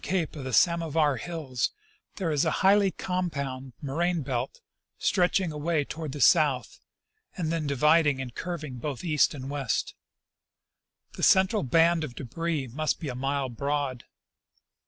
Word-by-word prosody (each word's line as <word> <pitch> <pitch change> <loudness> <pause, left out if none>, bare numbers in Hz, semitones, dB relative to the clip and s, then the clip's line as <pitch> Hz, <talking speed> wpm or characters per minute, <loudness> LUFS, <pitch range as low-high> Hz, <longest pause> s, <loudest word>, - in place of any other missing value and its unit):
cape 180 -5 -1
of 145 - -6
the 130 - -4
Samovar 160 -2 +3
hills 140 -4 -2 0.5
there 180 -5 -2
is 150 -2 +2
a 160 - +2 0.2
highly 200 0 +5
compound 140 -9 -3
moraine 165 +4 0
belt 130 -1 -3 0.4
stretching 180 -1 +1
away 150 0 -1
toward 155 -1 -6
the 145 - -6
south, 145 -5 +3 0.6
and 165 -3 -1
then 165 -3 -1
divid 150 +4 +4
ing 140 -2 +1
and 125 -2 -5
curving 150 -8 -5
both 145 +2 -4
east 155 -3 +2
and 130 -2 -7
west. 140 -6 -2 1.2
The - - -8
central 190 +3 +4
band 165 +5 +3
of 130 -6 -6
debris 155 +3 -3
must 150 +6 -2
be 155 - -4
a - - -3
mile 135 +1 -1
broad. 140 0 -2
150 Hz, 150 wpm, -27 LUFS, 135-170 Hz, 1.2 s, highly